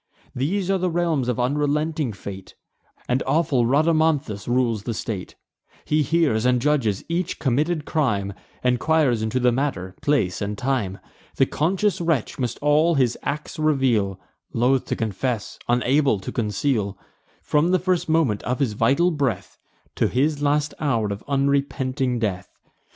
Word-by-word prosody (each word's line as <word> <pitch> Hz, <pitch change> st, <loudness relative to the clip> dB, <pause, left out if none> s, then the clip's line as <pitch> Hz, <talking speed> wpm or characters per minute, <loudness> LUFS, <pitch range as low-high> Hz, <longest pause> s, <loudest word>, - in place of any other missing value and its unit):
These 180 Hz, +9 st, -1 dB
are 195 Hz, -, +1 dB
the 180 Hz, 0 st, 0 dB
realms 165 Hz, -6 st, 0 dB
of 125 Hz, -1 st, -1 dB
unrelenting 150 Hz, +2 st, 0 dB
fate; 95 Hz, -2 st, -9 dB, 0.5 s
And 125 Hz, +1 st, +1 dB
awful 135 Hz, -4 st, +2 dB
Rhadamanthus 155 Hz, -6 st, +1 dB
rules 120 Hz, -3 st, +1 dB
the 115 Hz, +2 st, -4 dB
state. 105 Hz, -4 st, -5 dB, 0.5 s
He 155 Hz, +1 st, +2 dB
hears 145 Hz, -7 st, +2 dB
and 125 Hz, 0 st, +3 dB
judges 120 Hz, -8 st, 0 dB
each 175 Hz, +1 st, -2 dB
committed 150 Hz, +3 st, 0 dB
crime; 105 Hz, -10 st, 0 dB, 0.3 s
Enquires 125 Hz, -1 st, +2 dB
into 110 Hz, +3 st, 0 dB
the 125 Hz, 0 st, +3 dB
manner, 120 Hz, -9 st, -2 dB
place, 110 Hz, -12 st, +1 dB
and 105 Hz, 0 st, -3 dB
time. 125 Hz, -7 st, -1 dB, 0.4 s
The -, -, +4 dB
conscious 190 Hz, +5 st, 0 dB
wretch 165 Hz, -9 st, -1 dB
must 125 Hz, -2 st, -2 dB
all 155 Hz, +3 st, +4 dB
his 125 Hz, -4 st, +2 dB
acts 150 Hz, +3 st, -4 dB
reveal, 125 Hz, -11 st, +1 dB, 0.3 s
Loth 125 Hz, +3 st, +2 dB
to -, -, -2 dB
confess, 110 Hz, +1 st, -3 dB
unable 125 Hz, -1 st, +2 dB
to -, -, -5 dB
conceal, 105 Hz, -2 st, -1 dB, 0.5 s
From 150 Hz, +3 st, +2 dB
the 185 Hz, -, +4 dB
first 180 Hz, -2 st, 0 dB
moment 155 Hz, -11 st, +2 dB
of 125 Hz, +2 st, -2 dB
his 130 Hz, -7 st, 0 dB
vital 140 Hz, +12 st, +3 dB
breath, 135 Hz, -, -2 dB, 0.4 s
To -, -, +3 dB
his 145 Hz, +3 st, 0 dB
last 145 Hz, +1 st, +1 dB
hour 115 Hz, -8 st, 0 dB
of 100 Hz, -, -9 dB
unrepenting 135 Hz, -2 st, 0 dB
death. 95 Hz, -5 st, -2 dB
135 Hz, 145 wpm, -23 LUFS, 115-155 Hz, 0.5 s, The